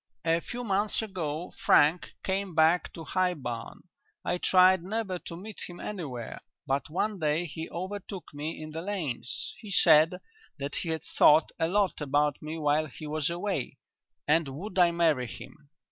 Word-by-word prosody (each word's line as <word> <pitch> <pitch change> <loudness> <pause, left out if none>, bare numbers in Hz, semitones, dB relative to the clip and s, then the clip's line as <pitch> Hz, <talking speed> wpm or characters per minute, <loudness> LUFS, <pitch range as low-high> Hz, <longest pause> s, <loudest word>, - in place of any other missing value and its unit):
"A 165 0 +3
few 245 +8 -6
months 205 0 +2
ago 175 -5 -4
Frank 155 +4 +4
came 190 -2 -2
back 160 +3 +4
to 165 - -8
High 180 +3 +1
Barn. 120 -6 -6 0.4
I 175 - 0
tried 185 0 +5
never 195 0 -3
to 170 - -8
meet 210 +3 -9
him 175 -1 -10
anywhere, 140 - -6 0.2
but 135 0 -1
one 200 +5 -1
day 155 +2 +1
he 160 0 -6
overtook 190 -1 -6
me 150 +3 -5
in 155 0 -7
the 160 +1 -5
lanes. 165 -11 -4
He 215 - -10
said 160 -2 +6 0.4
that 140 +1 -3
he 170 - -2
had 160 -1 -2
thought 155 +2 +5
a 160 - +2
lot 195 -1 +1
about 145 0 +1
me 155 +1 -5
while 155 0 +1
he 155 +3 -10
was 150 0 -1
away, 175 -5 -3 0.5
and 160 +1 +3
would 180 +8 -5
I 175 -1 +7
marry 160 -7 +2
him. 145 +5 -11
165 Hz, 170 wpm, -29 LUFS, 150-185 Hz, 0.5 s, I